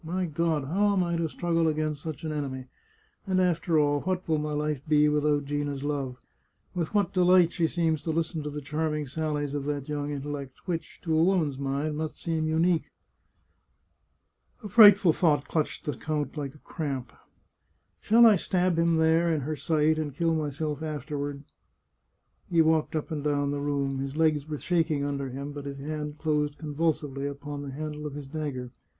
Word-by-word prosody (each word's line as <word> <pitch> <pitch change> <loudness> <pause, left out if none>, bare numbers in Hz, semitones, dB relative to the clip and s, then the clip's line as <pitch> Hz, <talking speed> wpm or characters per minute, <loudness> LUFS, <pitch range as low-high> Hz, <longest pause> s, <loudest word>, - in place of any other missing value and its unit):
My 180 +3 -2
God, 160 -2 0
how 200 +8 +2
am 190 -2 +2
I 170 -1 -1
to 165 -1 -1
struggle 165 0 0
against 155 -2 -1
such 160 -1 -6
an 160 - -2
enemy? 135 -4 -4 0.6
And 185 -1 +2
after 175 -2 +2
all, 145 -1 +2
what 185 -1 -2
will 160 -2 +2
my 150 0 -3
life 150 -2 -1
be 150 -1 +5
without 150 -1 +2
Gina's 145 -1 -2
love? 140 -4 -2 0.6
With 175 +2 -3
what 200 -4 +2
delight 180 -2 +5
she 170 -2 +1
seems 160 -3 0
to - - -5
listen 160 0 -1
to 150 - -4
the 150 0 -5
charming 150 +1 -2
sallies 145 0 -2
of 145 -1 -3
that 145 -2 -3
young 145 -1 -3
intellect, 140 -2 -6
which, 170 -2 -4
to 160 -2 0
a 160 - +4
woman's 165 -7 +1
mind, 140 +2 -2
must 155 0 -4
seem 160 -2 -1
unique! 165 +1 +2 0.9
" - - -40
A - - -4
frightful 205 -5 +8
thought 150 -5 +2
clutched 155 -2 -2
the 150 - -2
count 150 +2 -3
like 140 -2 -5
a 150 - -20
cramp. 135 -7 -4 0.4
" - - -45
Shall 235 +2 +6
I 215 -3 +7
stab 180 -1 +1
him 165 0 +3
there, 160 +1 +3
in 155 -2 0
her 155 +4 -3
sight, 155 0 +1
and 145 -3 -3
kill 165 +1 +1
myself 150 -1 -2
after 155 -1 -4
ward? 140 0 -4 0.5
" - - -43
He 165 -2 +5
walked 160 0 +2
up 155 +2 -3
and 150 -2 -3
down 145 -1 +1
the 145 0 -2
room; 140 -2 -1
his 135 +1 -4
legs 155 -2 +2
were 150 - -3
shaking 160 -3 0
under 140 -1 -2
him, 140 +3 -6
but 145 -1 -7
his 140 -1 -5
hand 150 +1 -5
closed 150 -2 0
convulsively 150 -3 -1
upon 145 0 -6
the 140 - -6
handle 150 +1 -5
of 145 - -7
his 145 -1 -6
dagger. 135 -4 -4
150 Hz, 195 wpm, -28 LUFS, 145-165 Hz, 0.9 s, frightful